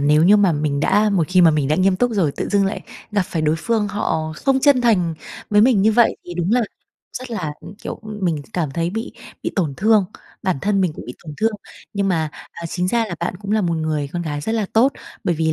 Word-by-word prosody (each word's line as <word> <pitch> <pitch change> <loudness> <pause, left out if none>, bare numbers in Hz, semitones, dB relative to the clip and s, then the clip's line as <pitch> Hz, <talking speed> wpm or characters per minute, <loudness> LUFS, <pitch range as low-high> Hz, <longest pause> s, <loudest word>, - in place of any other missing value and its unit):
nếu 150 +2 +4
như 205 +3 +7
mà 195 -5 +4
mình 145 -1 -1
đã 210 +4 +3
một 175 -6 +2
khi 185 0 +4
mà 170 - +7
mình 150 -3 0
đã 155 - +2
nghiêm 185 0 +3
túc 245 +3 +1
rồi 170 -9 +1
tự - - -3
dưng 200 -1 +2
lại 195 - -3 0.3
gặp 200 -2 +2
phải 160 -3 -3
đối 155 +1 +2
phương, 215 +2 0
họ 160 -6 -2
không 270 -1 +1
chân 280 -3 +5
thành 180 -9 +2 0.4
với 210 0 +5
mình 225 -4 +4
như 220 +1 +4
vậy 235 0 +4
thì 175 - -7
đúng 175 +5 0
là 250 - +4 0.6
rất 255 -1 -9
là, 175 -9 -3
ừm, 205 - -11
kiểu, - - -6 0.2
mình 160 -5 0
cảm 160 -6 -1
thấy 170 +4 -1
bị 225 +5 -4 0.3
bị - - -2
tổn 155 -8 0
thương, 215 0 +4 0.4
bản 185 -7 0
thân 200 -1 +1
mình 180 -4 +1
cũng - - -9
bị 125 - -7
tổn 150 -2 -8
thương. 225 0 +1 0.4
Nhưng 200 -1 0
mà, 160 -4 0 0.2
à, 170 0 -6
chính 180 +2 -1
ra 230 +1 +2
là 175 - -5
bạn 175 +1 -2
cũng 200 +1 -7
là 215 - +3
một 170 -3 0
người 155 -3 -1
con 175 -1 -2
gái 145 -2 -3
rất 220 - -2
là 220 -3 0
tốt, 250 +5 +4 0.3
bởi 175 - +1
vì 160 0 +1
185 Hz, 260 wpm, -20 LUFS, 160-215 Hz, 0.6 s, như